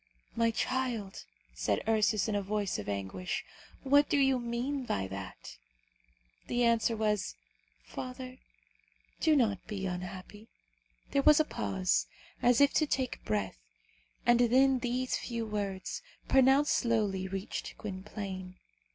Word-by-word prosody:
"My 230 0 +3
child," 230 -4 -2 0.3
said - - -1
Ursus 215 -1 +2
in 215 - -1
a 205 - +1
voice 200 - -2
of 105 - -5
anguish, 100 - -3 0.4
"what 285 +1 +4
do - - +3
you 270 -2 +3
mean 245 +4 -2
by 95 - -2
that?" 95 -10 -8 0.9
The 245 0 +1
answer 230 -1 +3
was, 210 - 0 0.5
"Father, 255 - -7 0.8
do 315 -1 +4
not 215 -9 +1
be 200 -3 -4
unhappy." 185 +4 -6 0.6
There 280 - +3
was 300 +2 +6
a 310 - +4
pause, 95 - 0 0.3
as 245 -1 +4
if 285 0 +5
to 310 - +3
take 260 -3 -2
breath, 100 - -2 0.7
and 240 0 +5
then 260 +2 +4
these 250 +1 -1
few 235 -2 -4
words, 205 - -3 0.3
pronounced 270 +2 +5
slowly, 210 -6 +1
reached 195 +1 -5
Gwynplaine. 190 -2 -6
220 Hz, 130 wpm, -31 LUFS, 190-255 Hz, 0.9 s, was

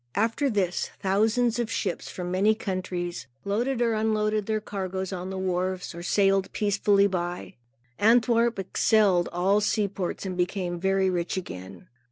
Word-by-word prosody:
After 230 +7 +1
this, 190 -6 0
thousands 225 +5 +2
of 235 -2 -1
ships, 195 -5 -3
from 180 -1 -5
many 200 +4 +3
countries, 180 -6 -4 0.2
loaded 240 +5 0
or 230 -1 +2
unloaded 215 -1 0
their 215 -1 0
cargoes 190 -2 -4
on 180 0 -5
the 190 - -5
wharves, 185 0 -2
or 170 - -8
sailed 195 +1 +2
peacefully 200 -1 +3
by. 180 -2 -3 0.5
Antwerp 235 +1 +4
excelled 195 -1 +2
all 190 +4 +2
seaports 200 -3 -1
and 185 -1 -3
became 180 -1 -2
very 190 +1 +2
rich 175 +1 -2
again. 95 - -8
195 Hz, 145 wpm, -26 LUFS, 180-215 Hz, 0.5 s, Antwerp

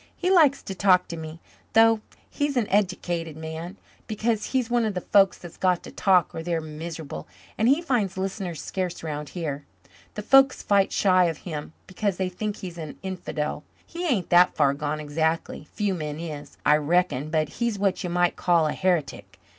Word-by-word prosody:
He 365 - 0
likes 305 -7 +5
to 195 - -5
talk 185 -1 +3
to 170 - -4
me, 160 0 -8 0.3
though 225 -1 +5 0.3
he's 290 -2 -2
an 235 - +2
eddicated 175 -5 -1
man, 160 +4 -7 0.3
because 220 0 -1
he's 255 -3 0
one 240 0 +1
of 215 -3 -1
the 180 - -2
folks 195 0 +4
that's 175 -2 -12
got 180 -2 +1
to - - -10
talk 185 -4 +3
or 160 - -5
they're 170 0 -1
miserable, 155 - -7 0.3
and 220 - +1
he 285 +7 +3
finds 220 - 0
listeners 190 -3 -3
scarce 180 -3 -4
'round 150 -2 -4
here. 145 -5 -4 0.5
The 210 - -5
folks 270 +3 +5
fight 200 -1 +3
shy 185 -2 +4
of 165 -2 -1
him 155 -3 -6
because 195 0 -2
they 185 -1 -1
think 205 +3 -4
he's 175 -2 -8
an 155 -2 -7
infidel. 165 -6 -4 0.2
He 345 +1 -4
ain't 225 - 0
that 175 +1 +6
far 140 -2 +3
gone 150 +1 -3
exactly 160 +1 -2
few 205 -2 -1
men 150 -3 -4
is, 150 -4 -7
I 150 - +6
reckon 155 -2 +1
but 155 -1 +1
he's 235 -3 +1
what 195 -1 0
you 180 - -3
might 175 0 +1
call 170 -3 +2
a 150 - 0
heretic. 180 -6 -1
180 Hz, 190 wpm, -25 LUFS, 160-205 Hz, 0.5 s, that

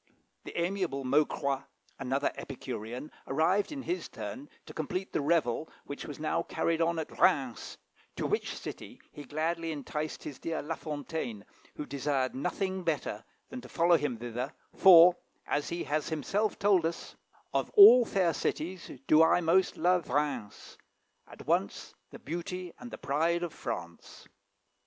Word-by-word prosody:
The - - -5
amiable 175 -6 -1
Maucroix, 140 0 +1 0.4
another 135 +1 0
Epicurean, 125 -1 -6 0.2
arrived 175 - +2
in 280 -3 -5
his 355 +2 -3
turn 285 +3 -7 0.2
to - - -11
complete 180 +5 -4
the - - +1
revel 150 -2 +1 0.2
which 140 - -7
was 145 - -7
now 155 +2 0
carried 165 0 -1
on 165 0 +1
at 160 - -6
Rheims, 135 -10 +1 0.4
to - - -3
which - - -1
city - - -8
he 145 - -9
gladly 165 +2 -2
enticed 150 +1 -4
his 145 - -7
dear 165 -1 -3
La 160 +3 -3
Fontaine, 145 -9 -5 0.3
who 150 - -5
desired 140 -2 -1
nothing 185 +6 -2
better 145 -9 -2 0.3
than 255 - -6
to - - -12
follow 170 +1 +4
him 145 -6 -1
thither, 120 +4 -4 0.2
for, 180 -2 +8 0.3
as 145 0 -1
he 170 0 -3
has 150 +1 -1
himself 195 +7 -1
told 200 -4 +3
us, 165 +1 -4 0.4
"Of - - 0
all 395 - +10
fair 185 -6 +1
cities 170 +4 -3 0.2
do 155 +1 +6
I 160 - +5
most 180 +2 +2
love 180 -1 +2
Rheims, 140 -6 -3 0.5
At - - -12
once - - -1 0.2
the - - -10
beauty 175 +2 -5
and 245 - -8
the - - -8
pride 165 +5 0
of 170 - -4
France." 85 0 -7
160 Hz, 155 wpm, -30 LUFS, 140-175 Hz, 0.5 s, all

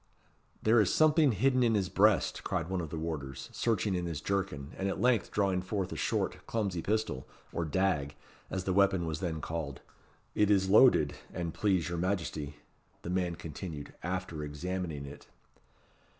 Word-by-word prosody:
"There 110 +1 +5
is 100 - +2
something 155 -2 +5
hidden 130 +5 +2
in 115 -2 +3
his 100 -3 +1
breast," 105 +2 +3
cried 85 - -2
one 95 -2 0
of 80 - -5
the 80 - -5
warders, 70 -5 -5
searching 110 -3 +1
in 90 -1 -1
his 80 -4 -3
jerkin, 95 -8 -2
and 95 +1 -1
at - - -3
length 125 -4 +3
drawing 95 -3 +1
forth 95 0 -3
a - - -4
short, - - -1
clumsy 100 -7 -1
pistol, 105 -11 -1 0.3
or 85 - -1
dag, 80 -5 0 0.3
as 95 -1 -2
the 95 - 0
weapon 95 -2 +3
was 80 -1 -3
then 80 -4 -3
called. 80 -4 -4 0.5
"It 105 -1 +3
is 95 -2 +3
loaded, 105 - +6 0.2
an 85 -2 -2
please 95 -2 +1
your 85 -1 -2
Majesty," 85 -6 -2 0.5
the 85 - -4
man 90 -2 0
continued, 75 -2 -7
after 90 -3 -3
examining 80 0 -4
it. 70 +1 -11
90 Hz, 170 wpm, -31 LUFS, 80-100 Hz, 0.5 s, loaded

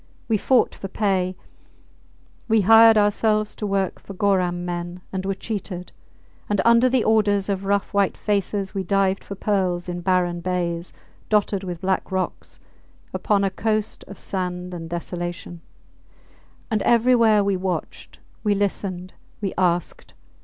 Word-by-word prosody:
We 225 - +2
fought 250 +4 +2
for 195 - -7
pay; 190 -2 0 1.1
we 220 -2 +4
hired 225 +2 +7
ourselves 210 +1 +2
to 210 - -4
work 195 -2 -1
for 195 - -10
Goram 180 -3 +1
men, 175 0 -5
and 190 0 -3
were 195 - -1
cheated; 190 -3 -5 0.6
and 205 -1 +1
under 235 +2 +5
the 250 -2 +2
orders 205 -3 +2
of 195 -1 -2
rough 200 +1 0
white 200 -2 +1
faces 200 -1 -1
we 195 - -1
dived 195 +1 +1
for 200 - -7
pearls 185 -3 -1
in 175 0 -4
barren 175 -1 +1
bays, 175 -1 -2 0.4
dotted 205 -2 +1
with 175 -3 -6
black 190 0 -1
rocks, 185 -1 -4 0.5
upon 200 -2 +1
a 195 - +1
coast 215 +1 -1
of 200 - -10
sand 180 -1 -4
and 165 -2 -7
desolation. 175 0 -5 1.1
And 215 -2 +1
everywhere 230 -3 +4
we 200 -1 +1
watched, 185 0 -4 0.3
we 210 -2 +2
listened, 185 -2 -2 0.3
we 195 -3 -3
asked. 175 -2 -1
195 Hz, 145 wpm, -23 LUFS, 180-210 Hz, 1.1 s, hired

